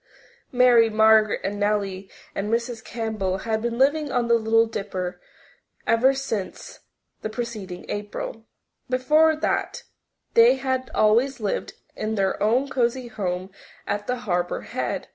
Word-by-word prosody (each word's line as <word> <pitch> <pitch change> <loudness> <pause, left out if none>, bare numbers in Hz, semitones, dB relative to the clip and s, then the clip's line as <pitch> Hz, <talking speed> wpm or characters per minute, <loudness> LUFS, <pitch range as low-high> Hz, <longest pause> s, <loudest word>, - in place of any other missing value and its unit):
Mary 245 -2 +5
Margaret 220 -1 +4
and 205 +2 -3
Nellie 200 -2 -1 0.2
and 205 +2 -3
Mrs. 235 0 -2
Campbell 215 -5 -2
had 220 +2 -2
been 235 0 -2
living 290 +2 +2
on 245 -1 0
the 235 - +3
Little 225 0 +4
Dipper 185 -5 -5 0.6
ever 255 +4 +4
since 225 -8 -5 0.4
the 215 - -3
preceding 215 -6 -6
April. 210 +2 -5 0.4
Before 305 +5 +4
that 310 - -2 0.5
they 235 +3 +7
had 260 -1 -2
always 240 +5 +3
lived 210 -3 -2 0.2
in 220 +1 -2
their 195 -2 0
own 240 +6 +2
cosy 245 -1 -1
home 185 -3 -3 0.3
at 205 0 -3
the 250 0 -2
Harbour 175 -2 -1
Head. - - -4
225 Hz, 135 wpm, -24 LUFS, 205-250 Hz, 0.6 s, they